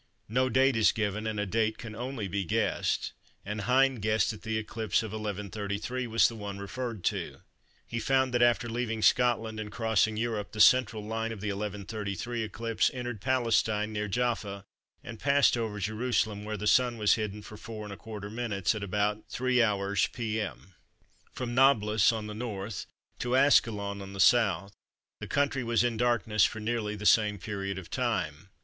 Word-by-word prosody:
No 130 +4 +1
date 135 0 +3
is 110 -1 +5
given 110 -1 -2
and 110 -1 -2
a 105 - 0
date 110 +2 0
can 110 -2 -8
only 120 -2 -4
be 100 +1 -2
guessed, 85 - -1 0.3
and 105 +1 -4
Hind 130 +2 +3
guessed 110 +2 +2
that 110 - -10
the 110 -1 -2
eclipse 110 +1 -1
of 110 - -6
1133 105 +3 -4
was 115 0 +4
the 115 - -6
one 100 -2 -6
referred 110 +1 -5
to. - - -2 0.4
He 115 - -4
found 130 +2 +1
that 120 - +2
after 120 0 +3
leaving 115 -2 -2
Scotland 115 -3 +2
and 105 -1 -5
crossing 110 -1 +1
Europe 110 -3 -2
the 110 - -7
central 110 -1 +5
line 115 +1 -2
of 110 - -6
the 105 +1 -3
1133 105 +2 -4
eclipse 115 0 0
entered 120 -4 -5
Palestine 115 -4 +1
near 105 0 -2
Jaffa 105 -3 -2 0.4
and 115 -1 -8
passed 140 -2 +4
over 110 -3 -3
Jerusalem 110 0 -1
where 105 0 -3
the 105 - -5
Sun 120 +2 +3
was 105 -1 +4
hidden 105 -2 -3
for 105 - -10
4¼ 105 -1 -8
minutes 110 -4 -1
at 110 - -5
about 105 +2 -1
3h. 105 -6 +1
p.m. 110 -4 -4 0.6
From 120 -1 -4
Nablous 115 -6 +4
on 110 -2 -4
the 105 - -6
N. 105 -2 -5 0.5
to 125 +1 0
Ascalon 105 -7 +3
on 100 0 -8
the - - -8
S. 100 -3 +3 0.5
the - - -6
country 140 -2 0
was 115 0 +2
in 120 -1 0
darkness 110 -2 +2
for 110 - +1
nearly 110 -1 -2
the 105 0 -7
same 105 -1 +4
period 100 -1 -4
of 95 -3 -9
time. 100 - -2
110 Hz, 170 wpm, -29 LUFS, 105-120 Hz, 0.6 s, is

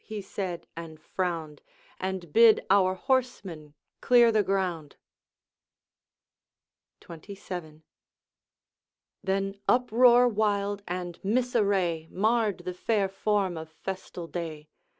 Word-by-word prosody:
he 215 -1 -6
said 190 -3 -5
and 165 -2 -9
frowned, 165 -3 -4 0.4
'And 185 -4 -4
bid 230 -1 +6
our 190 -1 +4
horsemen 190 - -2 0.3
clear 240 -2 +5
the 215 -1 +3
ground.' 185 -6 -2 2.1
XXVII. 170 -2 -9 1.4
Then 195 +1 -2
uproar 245 0 +5
wild 205 -2 0
and 175 -1 -5
misarray 200 -7 0
Marred 215 +1 0
the 180 - -3
fair 200 +2 0
form 195 -2 0
of 160 -1 -7
festal 185 -1 -7
day. 160 -3 -6
190 Hz, 95 wpm, -27 LUFS, 170-215 Hz, 2.1 s, bid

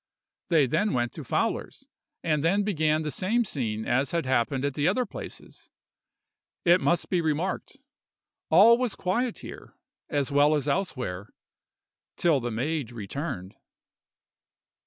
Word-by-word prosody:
They 160 -5 +5
then 205 - 0
went 120 -1 0
to - - -7
Fowler's, - - -2 0.4
and 150 -3 +1
then 195 +5 +2
began 155 -6 +1
the 150 - -2
same 220 - +1
scene 110 - -3
as 130 +3 +1
had 170 -4 -1
happened 130 +1 +1
at 145 - -1
the 145 +3 0
other 245 +7 +2
places. - - -10 1.0
It 175 +1 +5
must 170 - +1
be 180 -2 +2
remarked, 160 +4 -2 0.7
all 220 +8 +7
was 250 -5 -1
quiet 230 +6 -1
here - - -11 0.3
as 145 -2 0
well 145 +2 +4
as 145 -1 -1
elsewhere, 125 - -2 0.9
till 165 -5 +3
the 120 -1 -3
maid 130 +2 -2
returned. 115 - -5
150 Hz, 135 wpm, -27 LUFS, 130-180 Hz, 1.0 s, all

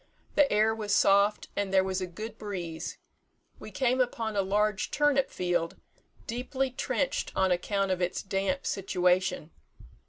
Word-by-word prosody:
The 290 -2 +4
air 215 +1 +3
was 210 -2 -1
soft, 200 +1 +3
and 200 -1 -1
there 190 -1 +4
was 190 0 -2
a 185 - -2
good 215 +5 -8
breeze. 175 -6 -5 0.6
We - - -9
came 255 +4 +1
upon 230 -3 -1
a 200 - +3
large 205 +1 0
turnip 290 -2 +2
field, 175 -2 -1 0.5
deeply 255 +2 -2
trenched - - -1
on 190 -1 +2
account 195 +2 0
of 185 -1 -1
its 180 +1 -1
damp 195 +8 -1
situation. 180 -3 0
200 Hz, 150 wpm, -29 LUFS, 185-225 Hz, 0.6 s, The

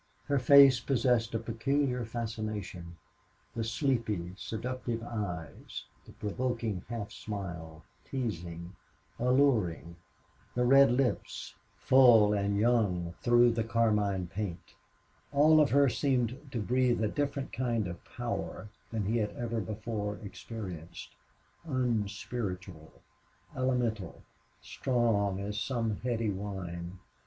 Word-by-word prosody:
Her 140 -1 +1
face 135 -1 +8
possessed 125 -4 +1
a - - +3
peculiar 125 +3 0
fascination. 110 -7 -5 0.6
The 115 - -1
sleepy, 115 - -1
seductive 115 +2 -4
eyes; 90 -10 -5 0.2
the - - -11
provoking 115 -3 -2
half 115 -4 -4
smile, 85 -7 -6 0.2
teasing, 90 -8 -5 0.4
alluring; 115 - +2 0.6
the 125 0 +2
red 135 0 +7
lips, 125 0 -1 0.2
full 120 -5 +6
and 100 0 0
young 100 -7 +1
through 120 0 +5
the 115 -1 0
carmine 105 -4 +1
paint; 95 -1 -5 0.6
all 155 +2 +6
of 150 - +3
her 140 +1 +5
seemed 130 0 0
to 120 - -2
breathe 125 +1 +2
a - - +3
different 140 +2 -2
kind 120 -4 0
of 85 -1 -5
a - - -27
power 120 -3 -4 0.2
than 110 -3 -2
he 110 +4 +1
had 105 -1 0
ever 115 -2 -2
before 105 0 -4
experienced 95 -6 -8 0.5
unspiritual, 105 - -3 0.6
elemental, 120 - -1 0.4
strong 110 -6 0
as 105 +1 -3
some 115 -5 -1
heady 115 -3 -1
wine. 95 -3 -5
115 Hz, 110 wpm, -31 LUFS, 100-125 Hz, 0.6 s, face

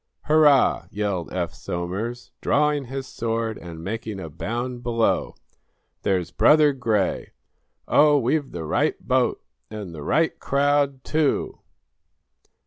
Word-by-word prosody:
"Hurrah!" 150 -3 +4
yelled 100 -5 -3
Eph 90 -2 -2
Somers, 100 +8 -5
drawing 150 -1 +2
his 135 +2 -5
sword 115 -3 -3
and 85 -2 -9
making 110 +1 -4
a 80 -4 -7
bound 120 - -4
below 115 -2 0 0.7
"There's 90 -3 0
Brother 150 -1 +5
Gray. 110 -7 -1 0.5
Oh, 150 0 +5
we've 140 +3 0
the 85 -2 -5
right 75 - 0
boat - - 0 0.3
and 105 -5 -7
the 75 - -8
right 160 - +1
crowd, 140 -1 +1
too!" 155 -2 0
120 Hz, 120 wpm, -24 LUFS, 95-140 Hz, 0.7 s, Brother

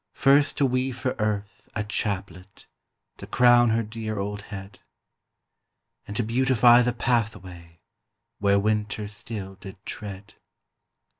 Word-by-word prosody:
First 140 +2 +4
to 140 - +3
weave 130 0 -1
for 130 0 -1
Earth 105 -1 -3
a 105 - -1
chaplet 100 -2 -4 0.5
To - - -10
crown 120 -1 +5
her 115 +1 +1
dear 110 0 -5
old 100 +1 -3
head; 100 -1 -9 1.3
And 105 - -6
to 120 - +1
beautify 120 +1 +5
the 125 0 +1
pathway 95 -9 -3 0.6
Where 100 0 +3
winter 105 0 -1
still 100 -2 -7
did 95 0 -10
tread. 105 0 -7
105 Hz, 125 wpm, -25 LUFS, 100-120 Hz, 1.3 s, crown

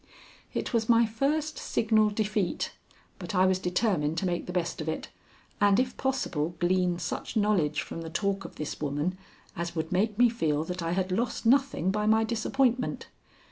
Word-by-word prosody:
It - - -3
was 225 -1 +1
my 230 0 +6
first 290 +7 -1
signal 215 -1 +2
defeat, 210 -2 -1 0.5
but 205 - -5
I 185 +1 +5
was 185 0 +2
determined 180 -4 0
to 190 - 0
make 175 -1 -2
the - - -4
best 175 -2 -2
of 155 - -3
it, 160 - -4 0.5
and 205 +1 +5
if 255 0 0
possible 180 - -1
glean 180 0 +1
such 180 +5 -4
knowledge 180 -9 +2
from 165 - -7
the 165 - -6
talk 195 +3 -1
of - - -10
this 150 - -5
woman 150 +5 -1 0.4
as 170 +1 -4
would 160 0 -3
make 205 +3 +1
me 245 +1 +6
feel 155 -10 0
that 180 +2 -5
I 165 0 -1
had 185 0 -1
lost 235 +5 -1
nothing 260 -7 +3
by 210 +1 0
my 220 +1 +4
disappointment. 240 +3 0
195 Hz, 180 wpm, -28 LUFS, 170-225 Hz, 0.5 s, my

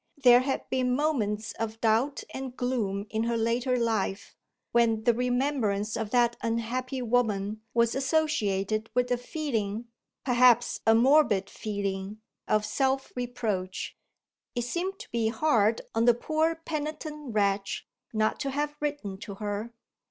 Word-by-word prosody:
There 245 -3 +7
had 265 +1 -2
been 250 -1 +1
moments 225 -8 0
of 225 0 -3
doubt 230 +6 +1
and 265 -1 -6
gloom 215 -6 -1
in 220 +1 0
her 235 0 0
later 240 +3 +1
life, 220 -4 -1 0.4
when 230 -2 +3
the 240 0 +4
remembrance 245 -4 0
of 220 -2 -3
that 240 0 +3
unhappy 250 +3 -2
woman 215 -3 0
was 235 0 +3
associated 220 - 0
with 250 0 +1
a 245 - +3
feeling 235 -6 -3 0.4
(perhaps 245 -2 +4
a 225 - +7
morbid 235 -6 +4
feeling) 200 -1 -4 0.3
of 215 0 +2
self 270 +3 0
reproach. 225 -7 -3 0.6
It 240 - 0
seemed 355 +10 -2
to - - -12
be 230 -1 +1
hard 230 -4 +2
on 225 +1 +2
the 240 -1 +6
poor 315 +6 0
penitent 305 -4 -5
wretch 200 -1 0 0.2
not 215 -1 0
to 275 - -2
have 295 +2 -2
written 285 -11 -3
to 200 -1 -7
her. 210 +2 -4
235 Hz, 140 wpm, -28 LUFS, 215-265 Hz, 0.6 s, There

